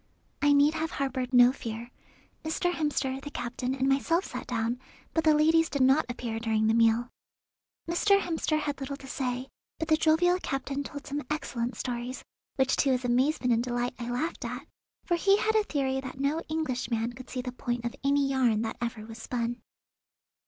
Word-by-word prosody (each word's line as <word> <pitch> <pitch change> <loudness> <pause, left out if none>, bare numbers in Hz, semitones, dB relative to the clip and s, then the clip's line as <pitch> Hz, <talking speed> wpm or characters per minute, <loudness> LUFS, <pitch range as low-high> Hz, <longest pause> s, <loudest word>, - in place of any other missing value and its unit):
I 290 - +5
need 285 +2 +5
have 320 0 -2
harboured 260 -3 -2
no 245 -1 +7
fear; 235 -2 -6 0.5
Mr. 320 +3 0
Hemster, 275 -4 -1
the 290 - -6
captain, 250 0 -3
and 265 0 0
myself 330 +7 +2
sat - - -6
down, 235 0 -1 0.3
but 325 - +1
the 310 -1 +5
ladies 320 +2 +4
did 280 -3 +1
not 270 +4 +4
appear 235 -2 -3
during 220 -1 +1
the 220 - +3
meal. 230 +1 +4 0.8
Mr. 395 +4 +4
Hemster 325 -3 0
had 290 -2 -3
little 275 +1 -4
to 275 - -12
say, 255 -1 -3 0.3
but 320 - -4
the 315 - +6
jovial 335 +3 +3
captain 275 +1 -2
told 285 0 -7
some 290 +1 -3
excellent 245 -5 -2
stories, 245 +1 -4 0.3
which 265 0 +2
to 280 - +3
his 250 0 -1
amazement 250 +1 +2
and 230 - +2
delight 245 0 -1
I 240 0 -4
laughed 300 +8 -2
at, - - -5 0.4
for 345 - +1
he 390 +3 +4
had 440 +1 +1
a 435 -1 +3
theory 265 -4 -1
that 265 0 -8
no 280 +3 +1
Englishman 250 -7 -1
could 255 +1 -11
see 250 -1 -4
the 250 - -4
point 245 -1 -3
of 235 - -3
any 280 0 +3
yarn 245 -5 +2
that 220 - -4
ever 235 -2 -3
was 225 0 -10
spun. 240 0 -3
265 Hz, 190 wpm, -29 LUFS, 245-300 Hz, 0.8 s, no